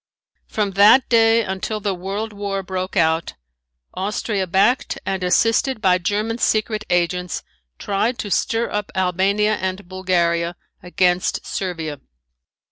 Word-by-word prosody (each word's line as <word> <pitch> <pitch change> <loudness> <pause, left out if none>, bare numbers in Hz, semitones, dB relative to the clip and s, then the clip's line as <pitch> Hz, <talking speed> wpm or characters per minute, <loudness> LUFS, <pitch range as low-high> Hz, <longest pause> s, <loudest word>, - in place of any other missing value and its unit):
From 210 -2 -1
that 205 +7 +6
day 225 -1 +4
until 190 +2 -3
the 205 -1 -1
world 200 +4 -4
war 200 -1 -3
broke 185 0 -4
out, 160 -1 +1 0.6
Austria 200 0 -2
backed 195 +9 +2
and 190 -1 -2
assisted 225 +7 +2
by 185 -3 +3
German 210 +5 -1
secret 215 -1 0
agents, 175 0 0 0.3
tried 215 +5 -1
to 205 - -5
stir 230 +4 0
up 210 0 -3
Albania 195 +3 +1
and 185 0 -4
Bulgaria 175 -2 0 0.3
against 180 0 0
Servia. 165 -6 -4
195 Hz, 125 wpm, -21 LUFS, 180-215 Hz, 0.6 s, that